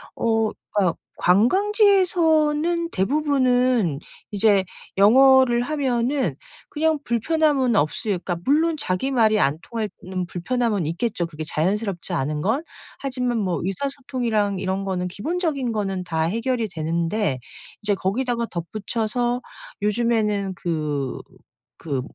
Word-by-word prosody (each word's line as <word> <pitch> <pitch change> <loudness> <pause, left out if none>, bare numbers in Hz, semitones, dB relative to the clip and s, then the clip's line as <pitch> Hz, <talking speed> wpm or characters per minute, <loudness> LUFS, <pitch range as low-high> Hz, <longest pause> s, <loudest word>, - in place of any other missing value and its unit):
어 225 -1 +1 0.2
그니까 190 -5 +2 0.2
관광지에서는 335 - +3
대부분은 250 - +2 0.3
이제 205 -1 +3 0.3
영어를 255 +3 +6
하면은 265 -1 0 0.3
그냥 315 +1 +1
불편함은 270 0 +1
없을 200 +5 0
그니까 180 -2 -2
물론 320 +4 +3
자기 185 +7 -1
말이 220 -4 +3
안 140 0 +1
통하는 190 -5 -5
불편함은 210 +1 -1
있겠죠, 175 +2 -1
그게 155 -1 -7
자연스럽지 185 +4 -2
않은 150 -1 -1
건. 225 - 0 0.4
하지만 250 -3 -1
뭐 185 -4 -1
의사소통이랑 235 -2 -1
이런 190 +1 -2
거는 180 -2 -2
기본적인 280 - -2
거는 195 -3 -2
다 165 -2 -1
해결이 230 +5 -1
되는데 165 -1 -1 0.4
이제 210 0 +2
거기다가 235 +5 -1
덧붙여서 220 +7 -2 0.4
요즘에는 210 -2 +1
그 150 -6 -2 0.6
그 140 -5 -3
220 Hz, 280 characters per minute, -23 LUFS, 185-265 Hz, 0.6 s, 영어를